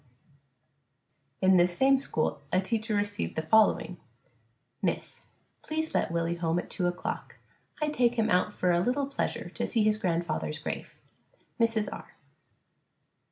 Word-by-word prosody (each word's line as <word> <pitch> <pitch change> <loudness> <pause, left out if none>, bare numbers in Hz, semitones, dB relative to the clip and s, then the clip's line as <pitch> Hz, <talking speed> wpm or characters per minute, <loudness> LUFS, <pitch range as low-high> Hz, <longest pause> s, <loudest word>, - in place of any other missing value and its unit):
W. 190 - +6
In - - +6
this 175 0 +3
same 270 0 +5
school 155 - -1
a 185 - +3
teacher 220 +3 -1
received 205 +1 -1
the 160 - -1
following: 220 +6 +3 0.9
_Miss - - +3
_: - - -9 0.4
Please 315 +1 -3
let - - +1
Willie 170 +1 -1
home 165 0 0
at 175 - -4
2 180 - 0
o'clock. 175 +1 -4 0.4
I 300 -1 +1
take 245 -5 +2
him 225 -2 +2
out 180 0 +2
for 180 - +1
a 175 - +3
little 255 +9 +1
pleasure 275 - -3
to - - -3
see 225 -3 +1
his 215 0 +2
grandfather's 170 -5 -1
grave. 155 - -5 0.6
MRS. 225 -2 +2
R. - - -11
205 Hz, 155 wpm, -29 LUFS, 175-230 Hz, 0.9 s, W